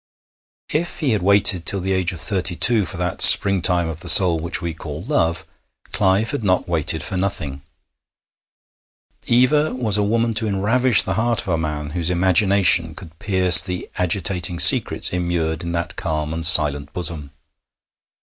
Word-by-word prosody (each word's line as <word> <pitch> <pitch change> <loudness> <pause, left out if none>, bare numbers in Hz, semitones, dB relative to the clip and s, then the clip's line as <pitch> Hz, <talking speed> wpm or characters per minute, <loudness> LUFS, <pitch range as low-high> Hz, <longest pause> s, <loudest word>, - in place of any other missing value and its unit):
If 170 +3 -4
he 145 -5 -3
had 105 -3 -3
waited 100 -2 +2
till 100 +3 +2
the 95 +1 -6
age 95 -2 -3
of 85 - -11
thirty 90 +1 -1
two 110 +2 +3
for 90 - -8
that 90 -1 -5
springtime 90 -3 +4
of 80 -1 -9
the 90 0 -3
soul 85 0 +5
which 85 +2 -5
we 85 -1 -7
call 80 0 -10
love, 85 - -3 0.5
Clive 100 +3 -1
had 145 -6 -6
not 90 -2 -2
waited 85 -4 -1
for 95 - -6
nothing. 80 -8 -6 1.7
Eva 130 +5 0
was 110 -5 0
a - - -1
woman 115 +2 -3
to 110 +1 -1
enravish 110 +5 +2
the - - -5
heart 120 -1 -2
of - - -10
a 85 - -2
man 75 -2 -7
whose 85 0 -2
imagination 95 -2 +2
could 80 -1 -14
pierce 95 -3 +4
the 90 -2 -6
agitating 90 -1 -2
secrets - - +4
immured 85 -2 -4
in 85 -1 -7
that 85 0 -6
calm 80 -3 -5
and 80 0 0
silent 75 -3 +3
bosom. 80 -5 -5
90 Hz, 170 wpm, -17 LUFS, 80-100 Hz, 1.7 s, soul